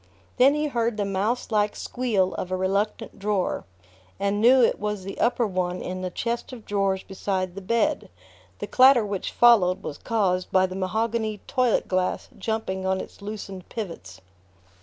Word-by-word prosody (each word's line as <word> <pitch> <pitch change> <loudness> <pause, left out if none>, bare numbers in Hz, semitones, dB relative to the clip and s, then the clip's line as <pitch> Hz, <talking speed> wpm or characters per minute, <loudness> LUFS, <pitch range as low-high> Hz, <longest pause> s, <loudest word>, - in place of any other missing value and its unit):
Then 270 +3 +6
he 300 0 0
heard 235 -5 -1
the 205 - 0
mouse 200 +6 -1
like 210 -1 +1
squeal 215 -7 0
of 180 - -4
a 185 - 0
reluctant 200 +3 -1
drawer, 200 -2 -1 0.5
and 200 +1 0
knew 250 +2 +6
it - - +2
was 210 -2 -3
the 195 +1 -7
upper 240 0 +2
one 180 -2 -2
in 185 0 -5
the 185 - -2
chest 235 +7 -3
of 235 -4 -10
drawers 195 -2 0
beside 190 -1 -3
the 195 - -7
bed: 230 +4 0 0.5
the - - -4
clatter 255 +1 +6
which 200 -2 -3
followed 210 -7 +5
was 145 - -6
caused 185 -5 0
by 185 0 +4
the 185 0 -6
mahogany 220 +3 -1
toilet 255 -4 +1
glass 185 0 -1
jumping 220 -4 -3
on 190 0 0
its - - -9
loosened 200 -3 -7
pivots... 130 - -7
200 Hz, 170 wpm, -25 LUFS, 185-230 Hz, 0.5 s, Then